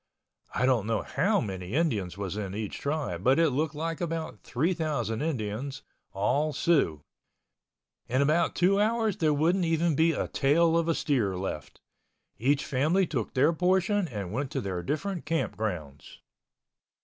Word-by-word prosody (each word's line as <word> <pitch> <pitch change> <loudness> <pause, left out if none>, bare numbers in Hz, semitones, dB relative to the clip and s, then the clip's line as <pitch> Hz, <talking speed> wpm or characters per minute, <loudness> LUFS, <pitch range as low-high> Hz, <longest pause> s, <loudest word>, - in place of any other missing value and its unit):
I 125 - +2
don't 120 -5 +2
know 115 -2 0
how 200 +8 +1
many 95 - -5
Indians 115 - 0
was 100 -1 -4
in 100 -2 -4
each 105 -1 -4
tribe 140 - -2
but 130 +4 +4
it 165 -3 +4
looked 150 +3 -1
like 165 +2 -3
about 165 -1 -3
3,000 145 - -1
Indians—all 135 +1 -2
Siouxs. 135 - +1 1.0
In 130 +2 0
about 160 +4 +2
two 195 +3 +3
hours 220 -2 +1
there 155 -2 +2
wouldn't 165 +6 +2
even 165 0 +2
be 160 +3 +3
a - - -2
tail 165 +4 +3
of 170 0 +2
a 165 - +2
steer 110 -11 0
left. 90 -5 -5 0.6
Each 140 +5 +2
family 155 +9 +2
took 130 -9 -3
their 145 +6 +4
portion 190 +3 +2
and 100 - -5
went 135 +3 -2
to - - -1
their 95 -3 -3
different 170 - -3
camp 165 +1 -1
grounds. 85 -10 -5
145 Hz, 155 wpm, -28 LUFS, 110-165 Hz, 1.0 s, but